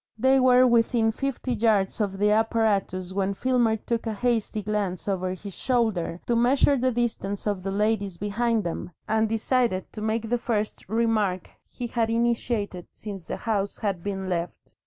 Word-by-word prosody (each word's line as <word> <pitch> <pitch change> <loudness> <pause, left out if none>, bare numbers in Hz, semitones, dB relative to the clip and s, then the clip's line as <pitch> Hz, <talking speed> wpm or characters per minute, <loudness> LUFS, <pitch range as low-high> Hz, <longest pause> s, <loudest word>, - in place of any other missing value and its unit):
They 265 +3 +4
were 255 0 +6
within 230 -1 +3
fifty 270 +1 -3
yards 215 -3 +1
of 195 -2 -1
the 210 +1 +3
apparatus 210 -4 +1
when 195 0 0
Filmer 240 -2 +2
took 230 +1 -3
a 220 - -1
hasty 225 -2 0
glance 205 -3 -2
over 185 -2 -1
his 200 +1 -9
shoulder 220 -10 0
to 240 - +1
measure 260 +4 +4
the 260 0 +1
distance 225 -4 -2
of 205 -3 -1
the 195 - -3
ladies 200 -2 0
behind 225 +3 0
them, 170 0 -4 0.2
and 220 0 +2
decided 225 -3 0
to 215 - -7
make 220 +1 -1
the 245 0 +1
first 215 -5 -2
remark 215 -5 0 0.2
he 245 - -6
had 230 -1 0
initiated 230 -5 -1
since 195 -5 -8
the - - -3
house 205 -3 -1
had 195 -5 -2
been 195 0 -4
left. 175 -1 -4
220 Hz, 170 wpm, -26 LUFS, 195-235 Hz, 0.2 s, were